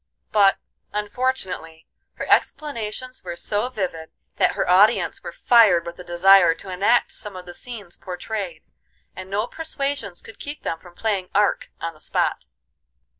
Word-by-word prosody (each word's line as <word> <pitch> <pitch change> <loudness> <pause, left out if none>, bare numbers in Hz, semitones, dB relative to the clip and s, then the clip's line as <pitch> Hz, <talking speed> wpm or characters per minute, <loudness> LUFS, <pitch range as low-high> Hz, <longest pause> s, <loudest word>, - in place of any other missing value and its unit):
But, 200 -2 +5 0.3
unfortunately, 205 -7 -3 0.3
her - - -5
explanations 255 -3 0
were 175 -2 -5
so 210 +7 -1
vivid 180 -9 -4 0.3
that - - +3
her - - -1
audience 200 +6 +4
were - - -6
fired 215 -9 +5
with 170 +1 -8
a - - -7
desire 175 0 +6
to 190 - -9
enact 205 +7 +2
some 210 -3 -5
of 180 -1 -8
the 175 - -9
scenes 210 -5 -9
portrayed, 180 -2 -5 0.5
and 185 0 -8
no 205 +3 0
persuasions 275 - -4
could 220 - -12
keep 290 +1 -7
them 165 - -2
from 175 0 -16
playing 200 -4 -1
Ark 205 0 +2
on 165 0 -4
the 155 - -20
spot. - - -1
195 Hz, 155 wpm, -23 LUFS, 175-230 Hz, 0.5 s, desire